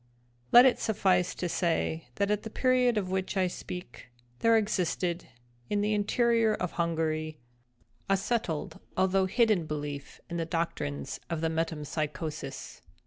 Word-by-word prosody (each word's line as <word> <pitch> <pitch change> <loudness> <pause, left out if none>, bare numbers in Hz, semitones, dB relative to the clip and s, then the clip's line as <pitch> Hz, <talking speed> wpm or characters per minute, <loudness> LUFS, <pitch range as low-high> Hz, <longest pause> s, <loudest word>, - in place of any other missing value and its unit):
Let 245 +2 +10
it 260 - +4
suffice 190 -4 +2
to 180 - -2
say, 165 -3 0
that 200 +1 +1
at 210 0 +1
the 220 - -7
period 250 0 +2
of 185 -3 -1
which 190 +1 -1
I 190 - +3
speak, 180 -4 -7 0.3
there 230 0 +5
existed, 180 -4 -1 0.4
in 205 -1 +1
the 210 +1 +1
interior 225 +1 +2
of 180 - -3
Hungary, 160 -2 -1 0.7
a 195 - +4
settled 195 -6 -2 0.2
although 190 0 +3
hidden 215 -6 +2
belief 145 -2 -5
in 170 - -4
the 165 - 0
doctrines 160 - -3
of 165 -2 -2
the 165 - +1
Metempsychosis. 155 -2 -4
180 Hz, 140 wpm, -29 LUFS, 160-210 Hz, 0.7 s, Let